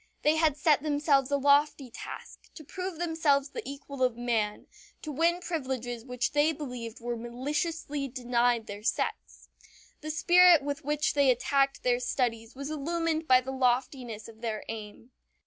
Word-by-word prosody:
They 300 +1 +4
had 315 -3 +2
set 295 -1 +3
themselves 290 -2 +2
a 285 - +2
lofty 280 -2 +2
task: - - -10
to 310 - -10
prove 365 +3 -6
themselves 320 -5 +1
the - - -5
equal 280 -1 -8
of 250 -2 +2
man 225 -4 -1 0.4
to 310 - -5
win 335 +5 +1
privileges 255 -8 -4
which 250 -1 -2
they 295 +2 +3
believed 250 -6 -7
were 240 0 -3
maliciously 280 +5 -3
denied 245 -2 +1
their 205 0 -8
sex. 225 +1 -3 0.5
The 310 - -7
spirit 345 0 +6
with 285 0 -4
which 295 +1 0
they 280 -2 +4
attacked 275 +2 +1
their 245 -1 +2
studies 240 -2 -2
was 280 +3 -5
illumined 320 +1 -1
by 255 -2 +6
the 265 +1 -6
loftiness 250 -3 -1
of 225 -1 -14
their 220 -3 -3
aim. 220 +2 -8
275 Hz, 160 wpm, -29 LUFS, 240-300 Hz, 0.5 s, spirit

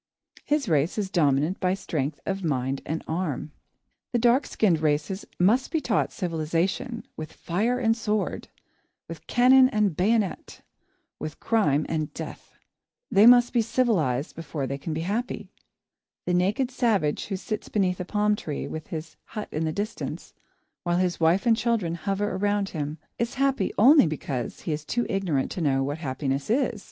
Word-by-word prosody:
His 290 -3 0
race 155 +1 +1
is 200 -3 -2
dominant 150 +1 +2
by 185 0 +1
strength 150 -6 -3
of 195 0 -2
mind 135 -3 -1
and 160 +2 -3
arm. 160 -4 -3 0.6
The - - +3
dark 240 +3 +3
skinned 180 -7 +2
races 155 +5 0
must 220 +9 +3
be 320 - 0
taught - - 0
civilisation, 180 - -2
with 155 -1 -7
fire 215 +8 -1
and 225 -3 +2
sword, 215 -2 -2 0.6
with - - -10
cannon 255 +1 +6
and 210 - +1
bayonet, 205 +2 0 0.6
with 155 - -6
crime 155 -11 +2
and 155 -2 -2
death. - - -8 0.6
They 210 +2 +7
must 245 0 +7
be 240 - +4
civilised 180 - 0
before 155 -3 -4
they 140 +2 -4
can 160 - -5
be 155 +1 -2
happy. 215 +8 -3 0.7
The 180 - 0
naked 200 +9 +1
savage 215 - +1
who 195 - -2
sits 210 +2 -5
beneath 185 -3 0
a - - -2
palm 210 +3 +1
tree, 150 -7 -5
with 160 0 -6
his 160 0 -7
hut 210 -1 -6
in 155 +2 -1
the 155 - 0
distance, 205 +6 -5 0.5
while 175 -1 0
his 180 -1 0
wife 170 +6 +3
and 230 -1 +5
children 225 -8 0
hover 195 +4 -2
around 205 0 0
him, 150 -1 -4 0.2
is 235 +1 -1
happy 270 -6 +1
only 270 - +7
because 140 -5 -4
he - - -3
is 150 0 -4
too 240 +9 -1
ignorant 180 -9 0
to 180 - -4
know 135 -3 +2
what 145 +3 -3
happiness 135 0 -2
is. 240 -2 +1
185 Hz, 165 wpm, -26 LUFS, 155-225 Hz, 0.7 s, They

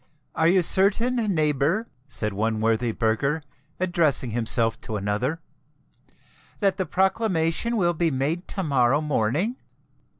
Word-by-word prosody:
"Are 160 - +2
you 180 +1 +4
certain, 205 +8 +3 0.2
neighbour," 155 - +1 0.2
said 105 -6 -2
one 110 +2 -1
worthy 115 +1 +1
burgher, 120 +8 -1 0.4
addressing 165 -9 +1
himself 115 0 0
to 110 - -6
another, 105 +11 -2 1.2
"that 195 -2 +1
the 190 -3 -2
proclamation 190 +3 0
will 175 -4 +2
be 170 0 +1
made 150 +6 -2
to 190 - -3
morrow 135 -3 +2
morning?" 150 - -1
155 Hz, 125 wpm, -24 LUFS, 120-185 Hz, 1.2 s, you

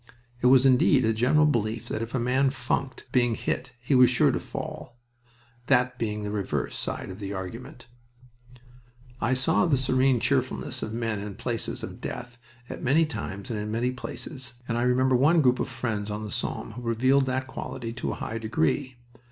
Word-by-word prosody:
It 125 - +4
was 130 0 +6
indeed 130 0 +5
a 110 - +2
general 130 +7 +4
belief 115 -5 0
that - - -2
if 115 +2 -4
a - - +1
man 130 +3 +2
funked 130 0 -3
being 120 -2 +3
hit 125 +3 -3
he 120 +4 -1
was 125 -2 +7
sure 125 - +4
to - - -1
fall, 120 - -7 0.7
that 125 -1 +2
being 105 -2 -2
the 105 - -3
reverse 100 -2 -2
side - - -4
of 95 - -9
the 100 -1 -4
argument. 105 +6 -7 1.4
I 125 +4 +2
saw 160 +7 +3
the 145 -5 +3
serene 130 0 +3
cheerfulness - - 0
of 110 - -4
men 115 -2 -2
in 100 - -5
the 105 - -5
places 120 -2 -3
of - - -7
death 120 0 -6 0.3
at - - -7
many 150 +6 +3
times 100 -9 -5
and 110 - -2
in 105 0 -4
many 120 +3 0
places, 130 +1 -6
and 115 - -1
I 120 - 0
remember 125 +1 +3
one 150 +7 +5
group 125 -4 +3
of - - -1
friends 110 -4 -3
on 105 +1 -4
the 105 - -6
Somme - - -3
who 125 - -8
revealed 130 +4 +2
that 130 0 -1
quality 120 -3 -6
to 125 - -3
a - - -2
high 115 +1 -4
degree. 130 +3 0
125 Hz, 195 wpm, -27 LUFS, 115-130 Hz, 1.4 s, was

